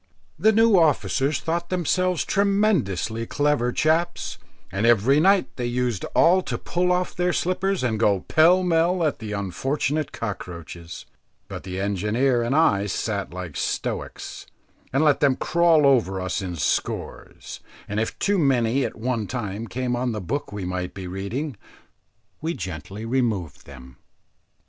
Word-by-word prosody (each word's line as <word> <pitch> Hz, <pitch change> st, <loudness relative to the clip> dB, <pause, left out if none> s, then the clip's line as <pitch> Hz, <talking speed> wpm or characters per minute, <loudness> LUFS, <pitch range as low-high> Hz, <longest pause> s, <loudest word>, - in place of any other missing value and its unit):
The 220 Hz, -, +5 dB
new 225 Hz, -3 st, +5 dB
officers 140 Hz, -, +1 dB
thought 170 Hz, +1 st, -2 dB
themselves 185 Hz, 0 st, 0 dB
tremendously 185 Hz, -, +1 dB
clever 145 Hz, -4 st, +1 dB
chaps, 165 Hz, +5 st, 0 dB, 0.3 s
and 100 Hz, +5 st, 0 dB
every 120 Hz, +5 st, +4 dB
night 195 Hz, +4 st, +3 dB
they 120 Hz, -1 st, -2 dB
used 120 Hz, -4 st, -1 dB
all 185 Hz, +3 st, +5 dB
to -, -, -4 dB
pull 180 Hz, +1 st, 0 dB
off 180 Hz, 0 st, 0 dB
their 180 Hz, 0 st, +1 dB
slippers 185 Hz, +1 st, 0 dB
and 110 Hz, -4 st, 0 dB
go 100 Hz, -4 st, +2 dB
pell 175 Hz, -, +4 dB
mell 175 Hz, +1 st, +2 dB
at 150 Hz, -, -1 dB
the 110 Hz, -2 st, -5 dB
unfortunate 135 Hz, -, -2 dB
cockroaches; 85 Hz, -5 st, -7 dB, 0.4 s
but -, -, -7 dB
the 95 Hz, 0 st, -6 dB
engineer 105 Hz, +6 st, +1 dB
and 120 Hz, +4 st, 0 dB
I 105 Hz, -11 st, +3 dB
sat 100 Hz, +1 st, -2 dB
like 90 Hz, -4 st, -7 dB
stoics, -, -, -4 dB, 0.4 s
and 135 Hz, +4 st, +2 dB
let 150 Hz, -2 st, +4 dB
them 140 Hz, -3 st, +3 dB
crawl 170 Hz, -2 st, +3 dB
over 115 Hz, -9 st, +3 dB
us 95 Hz, +2 st, -2 dB
in 90 Hz, -2 st, -4 dB
scores, 75 Hz, -, -3 dB, 0.3 s
and 105 Hz, +1 st, -2 dB
if 110 Hz, -, -2 dB
too 200 Hz, -1 st, +1 dB
many 130 Hz, -3 st, +2 dB
at -, -, -3 dB
one 115 Hz, -2 st, -2 dB
time 110 Hz, -2 st, -4 dB
came 125 Hz, +1 st, -2 dB
on 120 Hz, -1 st, -1 dB
the 105 Hz, -, -3 dB
book 120 Hz, -, -4 dB
we 100 Hz, -2 st, -5 dB
might 90 Hz, 0 st, -4 dB
be 95 Hz, -1 st, -6 dB
reading, 100 Hz, -, -4 dB, 0.8 s
we 165 Hz, +2 st, -2 dB
gently 95 Hz, +5 st, -6 dB
removed 115 Hz, -, -2 dB
them. 65 Hz, -2 st, -13 dB
125 Hz, 150 wpm, -24 LUFS, 100-165 Hz, 0.8 s, The